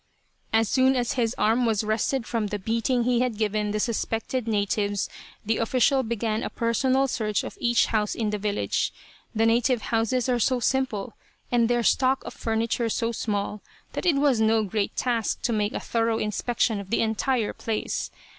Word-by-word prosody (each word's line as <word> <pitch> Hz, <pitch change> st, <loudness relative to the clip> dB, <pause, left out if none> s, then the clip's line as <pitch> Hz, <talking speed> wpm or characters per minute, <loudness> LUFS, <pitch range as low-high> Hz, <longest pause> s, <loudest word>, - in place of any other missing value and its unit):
As 225 Hz, 0 st, +3 dB
soon 260 Hz, +3 st, +3 dB
as 245 Hz, -2 st, 0 dB
his 235 Hz, -2 st, 0 dB
arm 225 Hz, +4 st, +2 dB
was 220 Hz, -2 st, +1 dB
rested 220 Hz, +4 st, 0 dB
from 225 Hz, -4 st, -1 dB
the 210 Hz, -, -3 dB
beating 230 Hz, +4 st, 0 dB
he 245 Hz, 0 st, +2 dB
had 245 Hz, -3 st, 0 dB
given 210 Hz, -1 st, 0 dB
the 210 Hz, +1 st, -1 dB
suspected 230 Hz, +2 st, -2 dB
natives 205 Hz, -1 st, 0 dB, 0.4 s
the 220 Hz, +1 st, +1 dB
official 255 Hz, +3 st, +3 dB
began 225 Hz, -2 st, -2 dB
a -, -, -3 dB
personal 260 Hz, +3 st, +1 dB
search 215 Hz, -4 st, -1 dB
of -, -, -7 dB
each 240 Hz, -1 st, +3 dB
house 210 Hz, -2 st, 0 dB
in 215 Hz, -2 st, -1 dB
the 210 Hz, -, -2 dB
village. 205 Hz, 0 st, -1 dB, 0.4 s
The 225 Hz, +1 st, +3 dB
native 235 Hz, +1 st, +2 dB
houses 230 Hz, +3 st, +1 dB
are 245 Hz, -1 st, +1 dB
so 255 Hz, +2 st, +2 dB
simple, 250 Hz, -4 st, -1 dB, 0.4 s
and 235 Hz, -1 st, +3 dB
their 240 Hz, -1 st, +2 dB
stock 260 Hz, +3 st, +2 dB
of -, -, -7 dB
furniture 230 Hz, +1 st, -1 dB
so 230 Hz, +1 st, 0 dB
small, 210 Hz, -2 st, -3 dB, 0.3 s
that -, -, -2 dB
it 330 Hz, -, +4 dB
was 275 Hz, -5 st, +3 dB
no 220 Hz, 0 st, +3 dB
great 205 Hz, 0 st, -2 dB
task 235 Hz, -3 st, -1 dB
to 235 Hz, -, +1 dB
make 210 Hz, -1 st, 0 dB
a -, -, -2 dB
thorough 230 Hz, -1 st, 0 dB
inspection 220 Hz, +1 st, 0 dB
of 195 Hz, -1 st, -8 dB
the 230 Hz, -, +1 dB
entire 225 Hz, +1 st, 0 dB
place. 220 Hz, -2 st, -3 dB
225 Hz, 185 wpm, -25 LUFS, 215-245 Hz, 0.4 s, it